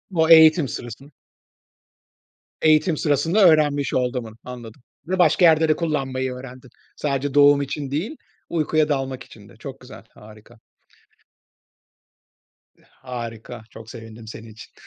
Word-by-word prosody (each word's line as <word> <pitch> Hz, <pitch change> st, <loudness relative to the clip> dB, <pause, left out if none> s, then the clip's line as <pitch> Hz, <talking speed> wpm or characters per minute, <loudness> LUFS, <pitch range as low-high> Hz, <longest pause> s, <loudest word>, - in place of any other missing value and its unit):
O 160 Hz, 0 st, +2 dB
eğitim 160 Hz, -2 st, +7 dB
sırasında. 120 Hz, +5 st, -9 dB, 1.5 s
Eğitim 155 Hz, +1 st, +3 dB
sırasında 165 Hz, +7 st, +2 dB
öğrenmiş 145 Hz, -3 st, +2 dB
olduğumun, 125 Hz, -3 st, -2 dB
anladım. 120 Hz, -1 st, -10 dB, 0.3 s
Ve 185 Hz, 0 st, -2 dB
başka 180 Hz, 0 st, +4 dB
yerde 160 Hz, -1 st, +4 dB
de 155 Hz, -, +3 dB
kullanmayı 135 Hz, -5 st, -2 dB
öğrendin. 125 Hz, 0 st, -11 dB, 0.3 s
Sadece 140 Hz, -1 st, -2 dB
doğum 145 Hz, 0 st, +5 dB
için 140 Hz, 0 st, -5 dB
değil, 195 Hz, -, -3 dB, 0.3 s
uykuya 155 Hz, -1 st, 0 dB
dalmak 135 Hz, -2 st, -3 dB
için -, -, -16 dB
de. -, -, -18 dB
Çok -, -, -9 dB
güzel, -, -, -13 dB
harika. 110 Hz, +2 st, -17 dB, 2.5 s
Harika, 115 Hz, -1 st, -7 dB
çok 110 Hz, 0 st, -13 dB
sevindim 115 Hz, -1 st, -11 dB
senin 110 Hz, +1 st, -10 dB
için. 110 Hz, -, -14 dB
140 Hz, 120 wpm, -22 LUFS, 120-155 Hz, 2.5 s, eğitim